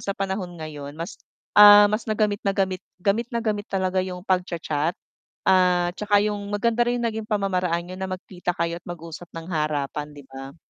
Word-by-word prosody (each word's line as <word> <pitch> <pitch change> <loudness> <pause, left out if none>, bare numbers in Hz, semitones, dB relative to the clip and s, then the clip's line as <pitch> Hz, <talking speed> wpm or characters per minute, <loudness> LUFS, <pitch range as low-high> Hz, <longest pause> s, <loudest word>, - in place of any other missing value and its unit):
sa 200 - -3
panahon 190 -2 -3
ngayon 150 -3 -7
mas, 170 +6 -7 0.3
ah, 205 0 +10
mas 220 +2 -2
na 215 - 0
gamit 210 -2 +1
na 200 - 0
gamit 190 -2 0 0.2
gamit 205 +5 0
na 235 -1 -2
gamit 210 -1 -1
talaga 190 -1 0
yung 180 -1 -5
pagcha-chat, 170 -4 -1 0.5
ah, 180 -2 +3
'tsaka 205 +1 +2
yung 210 -1 -1
maganda 230 +3 +1
rin 245 - +1
yung - - +1
naging 220 -1 -5
pamamaraan 185 -5 0
niyo 185 +1 -8
na 190 - -2
magkita 180 -1 -4
kayo 170 +1 -2
at - - -65
mag-usap 170 0 -8
ng 165 - -6
harapan, 150 -2 -1
'di 145 - -11
ba? 135 +2 -9
185 Hz, 190 wpm, -24 LUFS, 170-205 Hz, 0.5 s, ah